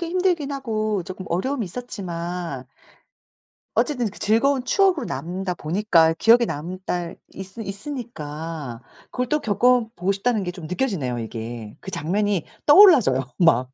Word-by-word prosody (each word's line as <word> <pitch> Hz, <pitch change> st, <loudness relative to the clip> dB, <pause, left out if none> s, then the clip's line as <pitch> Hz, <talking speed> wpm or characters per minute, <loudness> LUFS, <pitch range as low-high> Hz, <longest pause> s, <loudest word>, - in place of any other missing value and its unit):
힘들긴 345 Hz, -4 st, 0 dB
하고 215 Hz, -7 st, -1 dB
조금 185 Hz, +1 st, -8 dB
어려움이 235 Hz, +8 st, -1 dB
있었지만 175 Hz, -, -5 dB, 1.1 s
어쨌든 250 Hz, -6 st, +1 dB
그 -, -, -14 dB
즐거운 250 Hz, +5 st, +2 dB
추억으로 365 Hz, -2 st, +2 dB
남는다보니까 175 Hz, +1 st, +1 dB
기억에 230 Hz, +6 st, +5 dB
남다 175 Hz, +2 st, -4 dB, 0.2 s
있으 190 Hz, +4 st, -8 dB
있으니까 165 Hz, -, -6 dB, 0.3 s
그걸 250 Hz, -1 st, -2 dB
또 300 Hz, -, +2 dB
겪어보고 225 Hz, -4 st, +2 dB
싶다는게 200 Hz, -2 st, 0 dB
좀 175 Hz, -2 st, -9 dB
느껴지네요 180 Hz, -, -1 dB
이게 115 Hz, -1 st, -6 dB
그 190 Hz, -, -8 dB
장면이 195 Hz, +3 st, 0 dB, 0.2 s
떠올라져요 290 Hz, -, +7 dB, 0.2 s
막 130 Hz, -8 st, +3 dB
195 Hz, 315 characters per minute, -23 LUFS, 165-245 Hz, 1.1 s, 떠올라져요